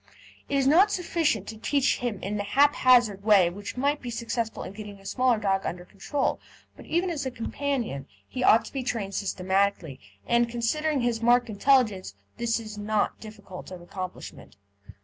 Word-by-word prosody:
It 280 - -1
is 270 - +2
not 345 +9 +6
sufficient 325 - 0
to 220 - -8
teach 275 +5 +1
him 240 -4 -2
in 205 +2 -2
the 205 - -2
haphazard 245 -3 +4
way 200 -5 +5
which 205 +6 -8
might 285 +3 0
be 245 - -6
successful 230 -1 -3
in - - -8
getting 205 -1 -9
a 195 - -19
small 250 +2 +2
dog 195 -2 0
under 175 0 -5
control, 265 +9 -2 0.4
but - - -14
even 345 +2 0
as 310 -4 -3
a - - -1
companion 240 - -3 0.2
he 255 - -4
ought 230 - +5
to - - -11
be 270 - -2
trained 225 -6 -3
systematically, 190 -7 -1 0.3
and, 235 0 +2
considering 275 +5 0
his 240 -1 0
marked 240 +1 +3
intelligence, 210 - +2 0.2
this 235 -1 0
is 215 -2 -8
not 210 0 -1
difficult 205 -4 -10
of 185 -1 -8
accomplishment. 185 +1 -8
225 Hz, 175 wpm, -26 LUFS, 200-260 Hz, 0.4 s, not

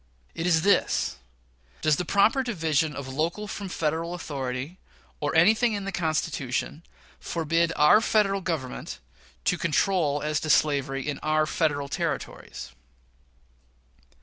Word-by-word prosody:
It 165 - -2
is 160 -2 +3
this: 200 +1 +2 0.7
Does 155 -2 +3
the 180 - -2
proper 210 +9 +3
division 160 - 0
of 140 -1 -6
local 165 +10 -2
from 200 -1 -6
Federal 165 +1 -2
authority, 140 0 -5 0.4
or - - -2
anything 220 +7 +4
in 200 -2 -3
the 195 - -3
Constitution, 155 -4 -2 0.4
forbid 165 0 0
our 150 +9 +6
Federal 200 -3 +2
Government 160 -8 -4 0.5
to - - +1
control 155 -3 +1
as 150 -1 0
to 155 - -5
slavery 140 -3 +2
in 145 -2 -3
our 155 0 +1
Federal 150 -3 0
Territories? - - -4
160 Hz, 125 wpm, -26 LUFS, 145-185 Hz, 0.7 s, our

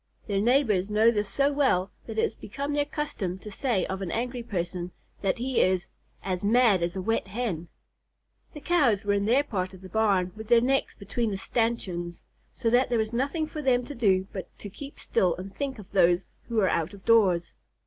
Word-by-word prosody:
Their 200 -2 0
neighbors 220 -5 +2
know 215 +2 +5
this 210 -3 -1
so 280 +4 +2
well 205 -10 +2 0.2
that 220 -1 -6
it - - +3
has - - 0
become 280 +7 -5
their 290 0 +1
custom 220 - -3
to 210 +2 -10
say 215 -3 0
of 190 +1 -4
an 190 - -3
angry 245 +5 -2
person 180 -5 -3 0.3
that 195 -2 0
he 255 +1 +1
is 185 0 +1 0.3
"as 185 -1 -2
mad 220 -3 +4
as 170 +1 -1
a 190 - -2
wet 225 0 0
Hen." 190 -6 -3 0.9
The 295 - -8
Cows 270 - +2
were 205 - +2
in 200 0 +1
their 250 +6 +4
part 190 -8 -3
of 185 - -14
the 190 - -10
barn 195 -4 +2
with 220 0 -8
their 235 0 +6
necks 270 +3 +1
between 220 +3 -2
the 195 - -3
stanchions, 190 -7 -2 0.3
so 230 -3 -1
there 245 0 +3
was 220 +1 -1
nothing 280 +6 0
for 305 0 -6
them 250 -3 +2
to 290 - -7
do 195 -7 +2
but 190 - -6
to 205 - -9
keep 280 +7 -9
still 180 -2 +1
and 190 +2 -8
think 275 -2 -3
of 205 -2 -12
those 175 -1 +3 0.2
who 235 - -5
were 205 -4 +3
out 165 +4 -1
of 195 - -17
doors. 190 -7 +3
215 Hz, 210 wpm, -27 LUFS, 190-245 Hz, 0.9 s, their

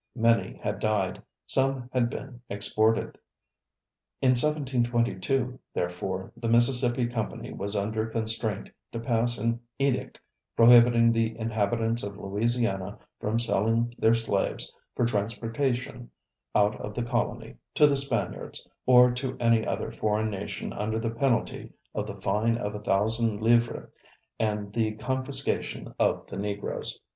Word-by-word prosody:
Many 115 -1 +2
had 105 -1 -2
died, 105 -4 0 0.2
some 135 -2 +2
had 120 -2 +2
been 125 -2 -8
exported. 110 +2 +1 1.0
In 130 - +3
1722, 125 -3 +1 0.2
therefore, 90 +2 -3
the 115 - -3
Mississippi 120 +1 +3
Company 120 -2 -4
was 100 +2 -4
under 110 +2 -1
constraint 110 -2 -2 0.2
to 115 - -3
pass 115 0 +1
an 115 +2 0 0.2
edict 135 -2 -1 0.4
prohibiting 115 0 +7
the 115 0 0
inhabitants 115 +1 0
of 100 -1 -6
Louisiana 105 -1 -1 0.2
from 110 +2 -1
selling 115 +1 +1
their 115 +1 +5
slaves 110 -4 -1 0.2
for 120 - +2
transportation 115 - -2 0.5
out 105 +1 +2
of 105 - -6
the 120 - -1
colony, 120 -1 -2 0.2
to 150 - +7
the 145 -1 +4
Spaniards, 135 -6 -2 0.2
or 125 -1 +7
to 130 +1 -3
any 115 -2 +3
other - - -2
foreign 110 0 0
nation 100 -1 -5
under 110 +2 -2
the 115 0 -1
penalty 120 0 -1 0.2
of 105 -1 -3
the 100 - -6
fine 105 +4 +1
of 105 -2 -3
a 105 - -5
thousand 110 +2 +1
livres 115 +1 +2 0.5
and 105 -2 -1
the 110 -1 0
confiscation 130 +5 -2
of - - +2
the - - -8
Negroes. 100 0 -3
115 Hz, 135 wpm, -27 LUFS, 105-120 Hz, 1.0 s, prohibiting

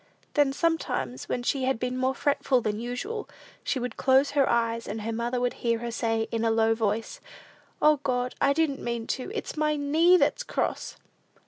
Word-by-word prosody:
Then, 290 -2 +3
sometimes, 275 - -1
when 245 - -2
she 265 +1 0
had 265 -1 +1
been 250 +1 -2
more 260 +1 0
fretful 275 -2 +1
than 215 -2 -2
usual, 320 - -4 0.3
she - - -1
would 245 -2 -4
close 265 +1 +3
her 280 -2 +2
eyes, 230 -1 0
and 215 +2 -4
her 225 +1 -2
mother 240 +2 -1
would 245 0 0
hear 230 -1 +1
her 235 +1 -5
say, 225 -1 -1
in 230 0 -1
a 230 - +3
low 225 0 +3
voice, 220 0 -2 0.6
"O, 305 0 +6
God, 250 -2 -1
I 275 - +4
didn't 285 -2 0
mean 235 -1 -3
to. 260 - -3
It's 435 - -4
my 305 -1 +1
knee 315 +5 +4
that's - - +1
cross!" - - -3
250 Hz, 195 wpm, -27 LUFS, 230-285 Hz, 0.6 s, O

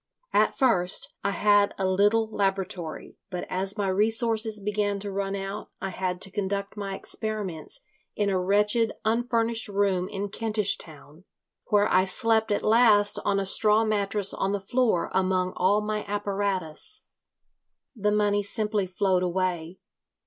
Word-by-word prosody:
At - - +2
first 190 -10 +2
I - - +1
had 205 0 +3
a 195 - -1
little 205 +4 +2
laboratory, 190 -5 -3
but 180 -2 -5
as 195 +3 -2
my 200 -1 -1
resources 220 +2 +2
began 205 0 -1
to 200 0 -5
run 195 0 -2
out 195 +2 -6
I 195 - -4
had 180 0 -3
to 195 - -3
conduct 200 0 -3
my 200 -2 -4
experiments 215 - -4 0.3
in 205 - 0
a 190 -2 +1
wretched 210 +4 +2
unfurnished 230 0 0
room 195 -3 0
in 200 +1 -4
Kentish 210 -2 +1
Town, 155 +2 -14 0.4
where 205 0 +3
I 185 +1 +3
slept 220 +3 +1
at 205 - 0
last 215 -2 +5
on 200 -1 +1
a 195 - -2
straw 215 +3 +3
mattress 205 -2 -1
on 195 +1 -1
the 205 - -1
floor 220 -2 0
among 185 -1 +1
all 205 +3 +2
my 210 0 -3
apparatus. 200 - -2 0.9
The 210 -2 0
money 205 -1 +2
simply 210 -1 -1
flowed 185 0 +1
away. 180 -1 -2
200 Hz, 150 wpm, -26 LUFS, 190-215 Hz, 0.9 s, last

